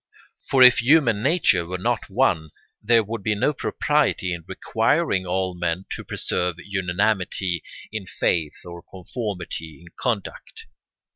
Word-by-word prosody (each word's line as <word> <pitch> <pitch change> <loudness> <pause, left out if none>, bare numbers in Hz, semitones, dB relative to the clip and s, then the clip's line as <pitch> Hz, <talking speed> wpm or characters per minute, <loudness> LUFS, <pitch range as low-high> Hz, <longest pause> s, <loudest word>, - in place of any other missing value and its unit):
For 135 -1 +6
if 125 -3 +8
human 120 -5 +4
nature 135 - +3
were 90 +1 -3
not 115 +4 -2
one, 95 -8 +1 0.3
there 115 +1 +4
would 110 +1 -5
be 105 +2 0
no 145 +8 +1
propriety 145 -10 0
in 85 -1 -6
requiring 110 - 0
all 95 0 -1
men 85 +1 -2
to - - -4
preserve 90 -1 -2
unanimity 95 -1 -1 0.3
in 105 -4 -5
faith 80 -2 -1
or 85 -1 -9
conformity 90 - -6
in 85 0 -15
conduct. 115 -6 -4
95 Hz, 135 wpm, -23 LUFS, 90-115 Hz, 0.3 s, if